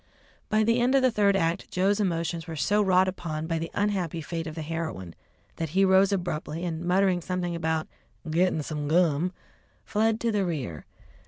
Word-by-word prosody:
By 215 0 +3
the 230 +2 +2
end 250 +3 +3
of 270 - +4
the 255 - +4
third 205 -2 +3
act 165 -2 0
Joe's 195 +3 +1
emotions 170 -3 -1
were 165 - -5
so 205 +7 +2
wrought 190 -1 +4
upon 160 -4 -4
by 165 0 -1
the 165 +1 -4
unhappy 190 -5 -1
fate 165 +1 -4
of 155 - -6
the 160 - -4
heroine, 155 - -4 0.4
that 165 -1 -3
he 195 - +6
rose 190 +1 +5
abruptly 175 -3 -2
and, 165 -2 -3
muttering 180 0 +2
something 175 0 -2
about 160 -1 -1 0.4
"gittin' 160 0 +1
some 150 -1 -4
gum," 165 +1 +2 0.5
fled 220 +1 +1
to 235 - +1
the 205 -2 +1
rear. 140 - -4
175 Hz, 185 wpm, -27 LUFS, 160-195 Hz, 0.5 s, he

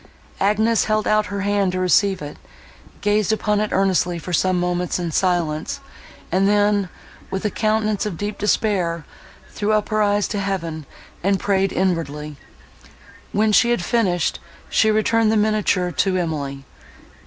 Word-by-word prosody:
Agnes 215 +3 +2
held 215 0 0
out 215 0 +2
her 200 -1 -4
hand 200 -1 +1
to 185 - -1
receive 185 -1 +2
it; 145 - -8 0.6
gazed 210 0 +1
upon 210 -1 +1
it 215 0 0
earnestly 185 -2 +1
for 175 +2 -6
some 185 +2 +2
moments 180 0 -1
in 175 -2 -3
silence; 165 -3 0 0.5
and 190 +3 +3
then, 205 -2 +2 0.4
with 190 +2 -4
a 210 - +1
countenance 215 -1 0
of 205 -6 -4
deep 205 +2 -4
despair, 185 -6 0 0.5
threw 210 +1 -1
up 215 -1 0
her 215 -1 +1
eyes 205 0 +2
to 205 - -3
Heaven, 165 -7 -3 0.4
and 195 +1 +2
prayed 195 -1 +1
inwardly. 155 -5 -2 1.0
When 215 +1 +2
she 235 +3 +4
had 240 -7 0
finished, 180 -8 0 0.3
she 220 - +3
returned 215 +1 +2
the 220 - +2
miniature 210 -4 +1
to 185 +1 +1
Emily. 140 -5 -3
195 Hz, 155 wpm, -21 LUFS, 175-210 Hz, 1.0 s, she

